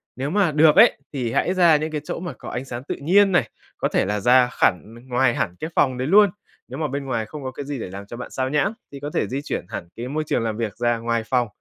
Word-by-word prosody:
Nếu 135 +3 -3
mà 195 -1 +2
được 150 +1 +5
ấy, 220 +5 +7 0.2
thì 125 -5 -2
hãy 180 - +1
ra 175 -4 +5
những 155 +1 -3
cái 150 -1 -3
chỗ - - -5
mà 175 -3 -5
có - - -8
ánh 125 +2 -4
sáng 120 -1 -6
tự - - -4
nhiên 195 +7 +4
này, 145 - +2 0.3
có - - 0
thể - - +1
là 105 +2 -1
ra 125 +4 +5
khẳn 105 +3 0
ngoài 125 -1 +2
hẳn 90 -3 -2
cái 160 - -4
phòng 130 -2 +2
đấy 130 +1 -2
luôn. 205 +4 +6 0.4
Nếu 130 +3 -7
mà 155 - 0
bên 140 0 -4
ngoài 115 -4 -2
không 150 +4 -9
có 130 - -4
cái 140 +2 -7
gì 140 -2 -4
để 105 - -5
làm 100 +1 -8
cho 120 +4 -9
bạn 125 - -8
sao 130 0 -2
nhãng 150 +9 +1 0.2
thì 140 - -8
có 145 +1 -5
thể - - 0
di 135 +2 -3
chuyển 145 - -4
hẳn 85 - -6
cái 120 +2 -5
môi 155 +4 -2
trường - - 0
làm 110 -2 -2
việc 110 -4 -3
ra 120 -1 +1
ngoài 115 0 -1
phòng. 125 -1 +1
130 Hz, 290 wpm, -22 LUFS, 120-155 Hz, 0.4 s, ấy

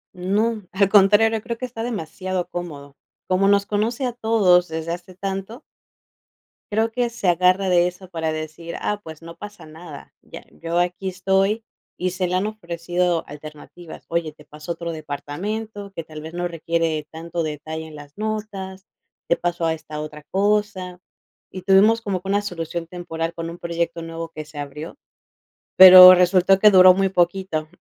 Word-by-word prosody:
No, 205 +3 -1
al 195 0 +2
contrario, 210 +2 +4
creo 235 +1 -5
que 255 - -4
está 230 -2 -7
demasiado 185 -4 -4
cómodo. 145 -5 -8 0.3
Como 185 +1 +2
nos 200 0 +3
conoce 225 +6 -1
a 245 - -1
todos 210 -7 +3
desde 160 +1 -5
hace 180 +1 -8
tanto 195 - -5 1.1
creo 220 +2 +1
que 245 -1 0
se 235 -5 -4
agarra 180 +2 +3
de 175 -1 +4
eso 180 +1 -9
para 160 -2 -3
decir: 155 +2 -7
"Ah, 210 0 -3
pues, 160 -1 -11
no 165 0 -11
pasa 205 -3 -10
nada, 155 -2 -12
ya - - -12
yo 165 +1 -3
aquí 180 +2 -1
estoy", 195 +4 0 0.3
y 180 0 -2
se 185 0 -2
le 180 - -1
han 190 +3 0
ofrecido 175 -4 -2
alternativas: 155 +3 -12
"Oye, 165 -2 -2
te 150 0 -19
paso 150 +3 -9
a - - -3
otro 170 0 -5
departamento 200 +8 -6
que 165 -3 -6
tal 155 -1 -10
vez 160 +2 -9
no 175 0 -2
requiere 165 -2 -2
tanto 165 +1 -5
detalle 155 +1 -6
en 155 - -12
las 145 +2 -14
notas, 205 -3 -5 0.4
te - - +3
paso 175 -1 -2
a 165 - +1
esta 155 -1 -8
otra 150 0 -8
cosa". 195 -2 -1 0.5
Y 185 - -8
tuvimos 210 +4 +5
como 195 -4 -3
que 190 - -7
una 200 +1 +2
solución 170 -3 -5
temporal 165 -2 -5
con 165 0 -6
un 170 - -9
proyecto 170 -1 -3
nuevo 165 0 -6
que 155 0 -7
se 150 0 -15
abrió, 145 - -7 0.8
pero 185 0 +11
resultó 180 +1 +4
que 210 - +7
duró 185 -1 +8
muy 195 0 +1
poquito, 175 -3 -1
180 Hz, 175 wpm, -22 LUFS, 165-195 Hz, 1.1 s, pero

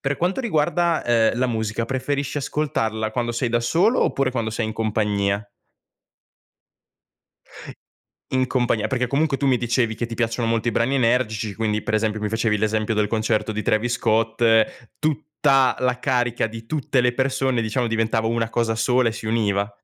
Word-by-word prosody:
Per 140 0 -1
quanto 180 +9 0
riguarda, 170 - +1
ehm, 115 -1 +2
la 130 - +2
musica, 110 -1 -2
preferisci 135 +3 -2
ascoltarla 115 -7 -2
quando 120 0 -2
sei 120 +1 -1
da 120 0 +1
solo 185 - +2
oppure 135 -1 +1
quando 115 -3 -2
sei 110 0 -2
in 110 - -4
compagnia? 105 -2 0 2.9
In 130 -1 +1
compagnia, 120 -4 0
perché 125 -1 -1
comunque 140 +1 +1
tu 140 - -1
mi 130 -2 +3
dicevi 120 -1 0
che 115 +2 -3
ti 115 - -6
piacciono 115 0 -1
molto 115 +1 0
i - - +3
brani 115 +4 0
energici, 115 -4 +1
quindi 105 -1 -1
per 110 - -3
esempio 110 0 0
mi 105 0 -3
facevi 115 -1 +1
l'esempio 110 +1 0
del 105 -1 +1
concerto 110 0 0
di 110 - -3
Travis 110 +3 +1
Scott, 115 0 0 0.6
tutta 150 -3 +1
la 125 -1 0
carica 125 -3 0
di 115 +1 -9
tutte 135 -1 0
le 125 0 +2
persone 130 -1 0
diciamo 115 +2 -1
diventava 115 0 0
una 115 -1 0
cosa 115 -1 0
sola 120 +1 +2
e - - -6
si 110 - -8
univa. 105 -2 0
115 Hz, 170 wpm, -22 LUFS, 110-130 Hz, 2.9 s, mi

